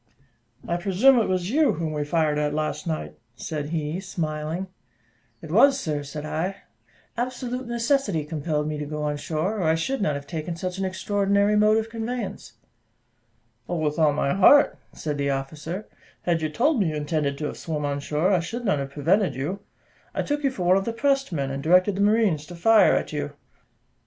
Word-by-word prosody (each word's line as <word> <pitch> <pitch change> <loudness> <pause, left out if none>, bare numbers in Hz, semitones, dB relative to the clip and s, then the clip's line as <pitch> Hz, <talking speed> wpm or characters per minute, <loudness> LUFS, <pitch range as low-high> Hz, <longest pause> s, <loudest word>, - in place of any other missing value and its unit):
"I 170 - 0
presume 205 +8 +4
it 225 - +1
was 185 +1 -1
you 305 +2 +3
whom 160 -1 -3
we 150 -1 -1
fired 150 -1 +1
at 150 0 0
last 155 0 -2
night?" 75 - -4 0.2
said 150 +2 -4
he, 160 +1 -2
smiling. 160 -1 -3 0.8
"It - - -8
was, 275 -1 +5
sir," 150 - -2
said 145 +1 -7
I; 175 +5 -3 0.5
"absolute 250 +1 -3
necessity 235 - 0
compelled 150 -1 -2
me 155 -1 -3
to 150 - -4
go 150 0 -4
on 150 0 -1
shore, 165 +8 -2
or - - 0
I 160 0 +3
should 240 +10 -2
not 150 -7 +1
have 140 0 -6
taken 160 +3 -4
such 180 +2 -4
an 195 - 0
extraordinary 200 +2 +1
mode 210 +1 +4
of 225 0 -2
conveyance." 225 - -5 1.2
"Oh, 175 - -1
with 155 0 -1
all 155 -2 +5
my 145 -1 0
heart," 240 +10 +6
said 150 -2 -4
the 140 0 0
officer; 150 +8 -4 0.4
"had 170 -2 +1
you 155 - -1
told 260 - +2
me 190 -5 +2
you 155 - -3
intended 150 -1 -1
to 150 - -3
have - - -4
swum 150 -3 -3
on 145 0 -1
shore, 150 +6 0
I 185 - +4
should 230 +9 -5
not 195 -9 +2
have 135 0 -4
prevented 170 - +1
you; 150 +10 -3 0.6
I - - 0
took 290 0 -2
you 275 - +3
for 230 -9 -5
one 180 +2 +5
of 195 - -1
the 230 - -2
pressed 270 +1 +1
men, 140 -5 -2
and 135 0 -4
directed 180 +6 +4
the 195 - -2
marines 205 -8 +2
to 175 - -9
fire 220 +6 +5
at - - -2
you." - - -3
170 Hz, 200 wpm, -25 LUFS, 150-210 Hz, 1.2 s, heart